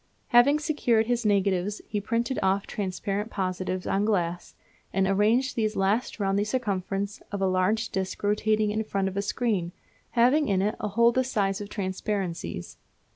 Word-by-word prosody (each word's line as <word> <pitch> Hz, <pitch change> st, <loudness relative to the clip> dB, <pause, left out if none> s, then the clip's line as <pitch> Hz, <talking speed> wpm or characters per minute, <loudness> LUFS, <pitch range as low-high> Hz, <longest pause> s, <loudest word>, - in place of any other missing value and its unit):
Having 245 Hz, +5 st, +6 dB
secured 290 Hz, -8 st, +1 dB
his 240 Hz, -1 st, 0 dB
negatives 200 Hz, 0 st, +1 dB
he 210 Hz, -1 st, -2 dB
printed 230 Hz, +4 st, -1 dB
off 195 Hz, +1 st, +1 dB
transparent 200 Hz, +2 st, -3 dB
positives 185 Hz, -2 st, -3 dB
on 195 Hz, -, +1 dB
glass, 175 Hz, -5 st, -1 dB, 0.4 s
and 195 Hz, 0 st, +1 dB
arranged 215 Hz, +7 st, +2 dB
these 215 Hz, -2 st, 0 dB
last 205 Hz, +6 st, 0 dB
round 195 Hz, 0 st, +1 dB
the -, -, +2 dB
circumference 200 Hz, -3 st, -2 dB
of 200 Hz, -, -3 dB
a 195 Hz, -, +1 dB
large 190 Hz, +4 st, +1 dB
disc 190 Hz, +1 st, -4 dB
rotating 210 Hz, +1 st, +2 dB
in 215 Hz, +1 st, -1 dB
front 195 Hz, -2 st, -1 dB
of 190 Hz, -, -4 dB
a 200 Hz, -, 0 dB
screen, 200 Hz, -5 st, -1 dB, 0.4 s
having 260 Hz, +6 st, +4 dB
in 195 Hz, -3 st, +2 dB
it 210 Hz, +2 st, +1 dB
a 210 Hz, -, -2 dB
hole 235 Hz, +3 st, +4 dB
the 260 Hz, +2 st, +1 dB
size 205 Hz, -6 st, -1 dB
of 205 Hz, -, -5 dB
the -, -, -10 dB
transparencies. 185 Hz, -, -3 dB
205 Hz, 175 wpm, -27 LUFS, 190-225 Hz, 0.4 s, Having